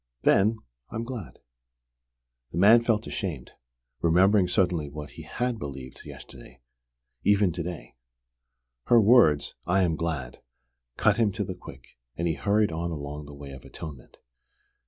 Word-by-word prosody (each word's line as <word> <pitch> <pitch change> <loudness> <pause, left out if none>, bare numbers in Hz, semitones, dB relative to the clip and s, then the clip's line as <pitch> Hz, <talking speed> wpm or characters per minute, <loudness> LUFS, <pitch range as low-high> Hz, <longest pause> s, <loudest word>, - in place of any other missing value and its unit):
Then 110 +3 +4 0.3
I - - -9
am 115 - -2
glad." 115 -6 -7 1.1
The - - -5
man 110 +6 +7
felt 115 -2 +1
ashamed, 85 - -5 0.5
remembering 95 +3 +4
suddenly 90 -5 +1
what 75 0 -8
he - - -10
had 125 -2 -3
believed 70 -4 -8
yesterday - - -12 0.6
even 100 -2 +4
to 85 +1 -4
day. 85 -2 -7 0.9
Her 120 - +6
words, 105 - +5
"I 95 +2 +3
am 85 -3 +1
glad," 75 -7 -4 0.6
cut - - +3
him 110 -3 +3
to 105 - -2
the 95 - -5
quick, 90 - -14 0.2
and 85 - -1
he 80 - +1
hurried 100 +7 +1
on 85 +1 -3
along 75 -2 -6
the 75 - -10
way 70 -1 -9
of 65 -1 -11
atonement. 70 -6 -10
90 Hz, 150 wpm, -27 LUFS, 75-105 Hz, 1.1 s, man